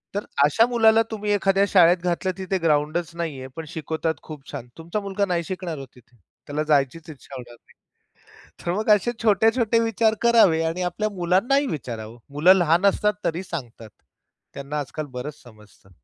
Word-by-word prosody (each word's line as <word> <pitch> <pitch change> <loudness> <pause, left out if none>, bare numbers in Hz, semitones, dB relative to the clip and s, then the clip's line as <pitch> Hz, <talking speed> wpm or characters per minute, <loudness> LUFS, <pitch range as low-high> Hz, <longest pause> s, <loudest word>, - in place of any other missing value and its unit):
तर 205 - -2 0.2
अशा 150 +10 +4
मुलाला 225 -2 +4
तुम्ही 210 -1 -2
एखाद्या 195 0 +2
शाळेत 180 -2 +5
घातलं, 180 +1 -1
तिथे 190 0 -2
ग्राउंडच 155 +2 +1
नाहीये, 150 -6 -5
पण 160 - -6
शिकवतात 160 +1 -3
खूप 150 -3 -11
छान 120 - -7
तुमचा 170 +6 -4
मुलगा 200 0 -2
नाही 175 -3 -1
शिकणार 180 -3 -5
हो 135 - -7
तिथे. 120 0 -22 0.3
त्याला 150 +1 -2
जायचीच 155 +2 0
इच्छा 140 -2 -12
होणार 120 -2 -9
नाही. - - -26 0.9
तर 175 - 0
मग 215 +4 -2
असे 240 +4 -1
छोटे-छोटे 225 +2 +3
विचार 225 -1 +2
करावे 225 -9 +5
आणि 165 +3 -2
आपल्या 215 +4 -2
मुलांनाही 195 +10 +1
विचारावं, 115 - -6 0.2
मुलं 165 +6 +6
लहान 175 0 +2
असतात 210 +1 +2
तरी 170 +3 -1
सांगतात. 120 -10 -8 0.6
त्यांना 140 +2 -5
आजकाल 145 +3 -5
बरंच 145 +4 -7
समजतं. 105 -4 -19
170 Hz, 165 wpm, -23 LUFS, 145-200 Hz, 0.9 s, मुलं